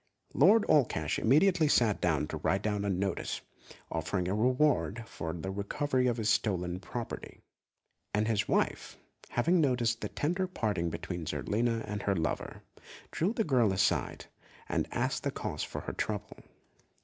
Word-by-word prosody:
Lord 220 0 +6
Allcash 110 - +2
immediately 155 - +4
sat 115 -7 +3
down 80 -4 +1
to - - -3
write 95 +2 0
out 105 -1 0
a 100 - 0
notice, 95 0 -2 0.5
offering 90 +3 -1
a 95 - 0
reward 125 0 +2
for 80 - -5
the 85 +3 -5
recovery 125 +7 0
of 120 -1 +1
his 110 -2 -1
stolen 90 -5 +1
property; 115 +4 -6 0.7
and 105 +1 +1
his 110 -3 +1
wife, - - 0 0.3
having 170 +8 +2
noticed 120 -5 +1
the - - -3
tender 180 +5 -1
parting 105 - -1
between 85 -1 -5
Zerlina 115 +6 0
and 105 0 -3
her 100 - +1
lover, 80 -1 -3 0.5
drew 175 +6 0
the 230 -1 0
girl 125 - +3
aside 90 -7 0 0.4
and - - -1
asked - - -1
the - - -1
cause - - -4
of - - -6
her - - -5
trouble. - - -3
110 Hz, 155 wpm, -31 LUFS, 95-130 Hz, 0.7 s, Lord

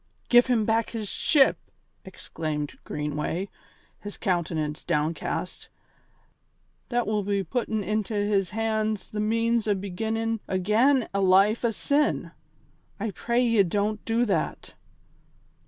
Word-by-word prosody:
"Give 245 +1 +6
him 235 -4 +2
back 225 +1 +1
his 220 -3 -5
ship!" 275 - +3 0.5
exclaimed 155 -5 -5
Greenway, 150 +6 -3 0.5
his 205 0 -8
countenance 165 -5 -2
downcast. 160 0 -2 1.2
"That 240 -1 0
will 210 0 0
be 200 0 -1
puttin' 220 -2 -2
into 215 +1 -2
his 205 -2 +1
hands 215 -1 -2
the 210 - -4
means 230 +1 +1
o' 205 - +3
beginnin' 220 +4 -2
again 220 +8 +2
a 200 - +1
life 195 +5 +4
o' 235 - +3
sin. 285 +7 0 0.7
I 215 +1 -2
pray 235 +5 0
ye, 230 -3 +4
don't 205 +3 -1
do 230 +2 +1
that." 185 -8 -2
210 Hz, 120 wpm, -26 LUFS, 190-225 Hz, 1.2 s, Give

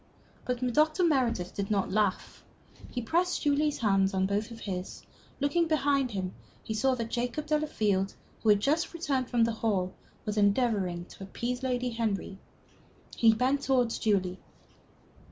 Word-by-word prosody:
But 250 0 -1 0.2
Dr. 310 +5 +3
Meredith 245 - +1
did 200 -1 -3
not 200 -3 0
laugh. 205 -1 -1 0.5
He 245 - -4
pressed 350 +9 +1
Julie's 295 0 +2
hand 195 -3 +2
in 190 0 +2
both 205 +3 -1
of 230 -1 -10
his. 185 -2 -5 0.4
Looking 290 +5 +2
behind 285 -4 +2
him, 190 -4 -3 0.3
he 220 - -4
saw 260 +4 +2
that 230 -2 -4
Jacob 245 +5 -2
Delafield, 215 -11 0 0.3
who 220 - +2
had 205 -1 +6
just 315 +7 0
returned 275 -6 -1
from 240 -2 +3
the 230 - +2
hall, 205 -5 -1 0.3
was 210 0 -3
endeavoring 200 -5 +1
to 195 - -12
appease 245 +6 -3
Lady 250 -1 -1
Henry. 210 -4 -2 0.8
He 230 -1 +6
bent 255 +5 +1
towards 250 -4 +1
Julie. 190 -4 +1
230 Hz, 155 wpm, -29 LUFS, 200-275 Hz, 0.8 s, had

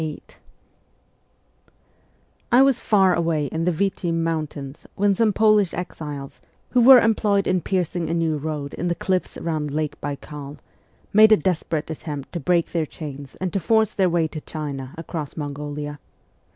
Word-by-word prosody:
VIII 155 -2 -5 2.3
I 250 +3 +7
WAS 270 -2 +3
far 195 -4 +3
away 165 -3 0
in 160 +3 -2
the 180 - +3
Vitim 170 -2 -1
mountains 155 -4 -4
when 205 0 +3
some 215 +2 +2
Polish 210 -2 +3
exiles, 150 -5 -6 0.3
who 250 - +4
were 260 +2 +10
employed 210 -3 +2
in 185 -1 +1
piercing 175 -3 -1
a - - 0
new 165 -2 0
road 145 -1 -4
in 175 - -3
the 175 - 0
cliffs 185 0 -2
round 155 -3 -2
Lake 150 0 -3
Baikal, 145 0 -6 0.6
made 215 +1 +7
a 215 - +8
desperate 160 -2 -2
attempt 145 -3 -6
to 170 - -2
break 170 +2 +1
their 165 -3 -1
chains 140 -3 -8
and 185 -2 -4
to 195 - +1
force 220 +3 +2
their 190 -2 +2
way 170 -2 +1
to 155 - -7
China 140 -5 -6
across 160 -2 -6
Mongolia. 145 0 -5
165 Hz, 160 wpm, -23 LUFS, 150-190 Hz, 2.3 s, were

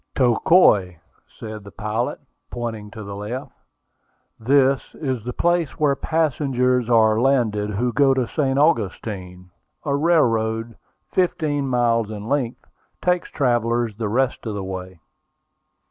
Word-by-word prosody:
"Tocoi," 120 - +4 0.4
said 110 -1 -8
the 100 - -11
pilot, 110 +4 -3 0.3
pointing 115 -3 -5
to 110 0 -9
the 100 0 -7
left. 105 +6 -6 0.9
"This 135 +3 +3
is 130 -7 -3
the 125 - -4
place 175 +2 0
where 145 -2 +3
passengers 130 -6 0
are 110 -1 +4
landed 115 -6 +1
who 115 +4 -1
go 135 0 +4
to 130 -3 0
St. 135 -2 0
Augustine. 95 - -1 0.3
A 140 -2 +1
railroad, 115 -8 +1 0.4
fifteen 155 -6 0
miles 115 -3 +1
in 105 0 -7
length, 130 -2 -2 0.4
takes 180 -1 +1
travellers 120 -4 0
the 110 -1 -3
rest 125 +1 0
of 105 - -3
the 100 - -4
way." 95 -1 -7
120 Hz, 130 wpm, -22 LUFS, 110-135 Hz, 0.9 s, Tocoi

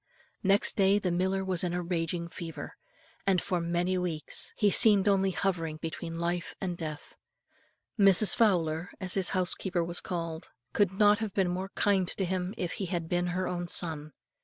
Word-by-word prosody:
Next 195 +1 +4
day 195 0 +3
the 190 -3 -1
miller 190 +2 -1
was 185 -2 0
in 175 -1 -1
a 180 - -1
raging 170 0 -3
fever, 165 -1 -8 0.5
and 190 -2 +3
for 180 -1 -2
many 175 +2 -1
weeks 170 -4 -1
he 205 -2 +3
seemed 205 -2 +5
only 195 -1 +3
hovering 175 -5 -2
between 165 +1 -6
life 175 +1 -3
and 180 -2 -3
death. 155 -3 -7 0.8
Mrs. 195 0 +5
Fowler, 175 -5 +1
as 185 -2 +1
his 190 -3 +3
housekeeper 180 -1 -1
was 170 +1 -4
called, 165 -3 -5 0.2
could 200 -3 +2
not 205 +1 +3
have 220 -3 -5
been 190 -3 +1
more 185 +2 -4
kind 195 -3 +2
to 190 - -2
him 185 +2 -3
if 180 -2 -3
he 195 - -4
had 170 -2 -4
been 175 0 0
her 180 +1 -2
own 175 -1 -3
son. 155 -3 +2
180 Hz, 180 wpm, -29 LUFS, 170-195 Hz, 0.8 s, seemed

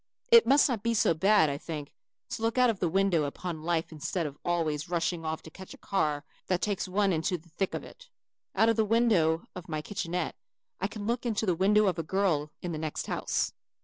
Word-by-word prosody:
It 465 -1 +8
must 280 +2 +6
not 240 -6 -2
be 230 +1 0
so 205 - +3
bad, 195 +1 +4
I 140 0 -3
think, 150 -3 -6 0.4
to - - -5
look 225 +2 0
out 250 -2 +5
of 205 - -8
the 175 - +1
window 185 -3 +2
upon 160 +3 -5
life 165 0 -1
instead 160 +3 -3
of 145 -2 -5
always 160 -3 -1
rushing 170 -1 -1
off 160 0 -3
to 160 - -11
catch 190 +3 -11
a - - -19
car 150 -6 -1 0.2
that 185 -1 +1
takes 200 -1 -1
one 195 +1 +2
into 165 +3 0
the 170 +1 -20
thick 185 +4 -2
of - - -4
it. - - -14 0.5
Out 225 - +4
of 225 - +2
the 220 - +4
window 205 -8 +2
of 180 -2 -9
my 155 -1 -3
kitchenette 180 -2 -3 0.4
I - - 0
can 210 -2 -7
look 235 +2 -1
into 225 -3 -1
the 185 - +2
window 205 +5 +4
of 180 -4 +1
a - - -1
girl 160 -4 0
in 175 - -3
the 155 - -4
next 155 -1 -3
house. - - -1
180 Hz, 230 wpm, -29 LUFS, 160-210 Hz, 0.5 s, It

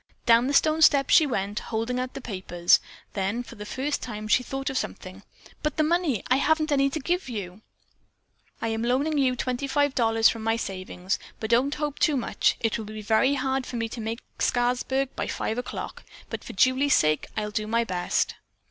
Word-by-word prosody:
Down 235 +2 +5
the 280 - -1
stone 310 +2 +3
steps 280 -3 +5
she 310 - +7
went, 205 -4 -2
holding 230 +2 -2
out 255 0 -4
the - - -5
papers. 185 -6 +2 0.3
Then 195 +2 -1
and 245 +1 -4
for - - -11
the 210 -2 -9
first 280 +5 -2
time 215 -3 -6
she 235 - +4
thought 270 +2 -4
of 265 - -2
something: - - -7 0.4
"But 300 - -2
the 310 - +3
money 315 - +1
I 255 - +3
haven't 310 +2 +2
any 275 -1 +3
to 310 - -3
give 350 +1 -1
you." 205 -7 -4
Meg's - - -18
answer 205 - -19
was: - - -40
"I - - +1
am 225 0 -2
loaning 270 +6 +1
you 255 -2 +2
twenty 255 +2 -2
five 285 0 +1
dollars 225 -3 +4
from 225 - -1
my 225 +1 +1
savings, 185 -2 -3 0.2
but 220 +1 -4
don't 260 +5 +3
hope 295 -1 -3
too 300 -4 +3
much. 245 - +1
It 225 0 0
will 220 - -5
be 215 0 -7
very 230 +6 +3
hard 265 -1 -1
for - - -6
me 230 -1 -1
to 230 - -6
make 225 +2 -4 0.2
Scarsburg 250 +2 +1
by - - -2
five 225 - -2
o'clock, 250 - -6 0.3
but - - -5
for - - -8
Julie's 265 +2 +3
sake 155 0 +2
I'll 210 -1 -2
do 215 0 -2
my 230 +2 +2
best." 180 -5 -1
245 Hz, 220 wpm, -26 LUFS, 220-275 Hz, 0.4 s, she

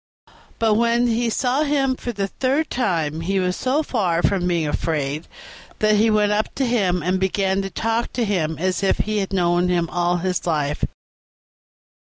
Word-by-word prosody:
But 225 -1 +2
when 235 +2 +2
he 235 0 +1
saw 250 +5 0
him 280 -3 +1
for 245 - -5
the 200 -3 -2
third 270 +9 -1
time 165 - -1
he 195 +3 0
was 180 -1 0
so 275 +5 0
far 180 - 0
from 185 -3 +1
being 170 -3 0
afraid 150 0 -2 0.5
that 215 0 +3
he 220 +2 +4
went 210 -1 +2
up 210 +1 -1
to 270 - 0
him 190 -8 +1
and 185 +2 0
began 190 0 0
to 195 - -4
talk 225 +5 -1
to 240 -2 0
him 165 -6 -1
as 185 +2 -1
if 195 - +2
he 215 0 -1
had 195 -1 -3
known 175 -1 +2
him 175 -2 +1
all 175 0 +1
his 180 0 -2
life. 150 -3 -1
195 Hz, 185 wpm, -21 LUFS, 175-230 Hz, 0.5 s, he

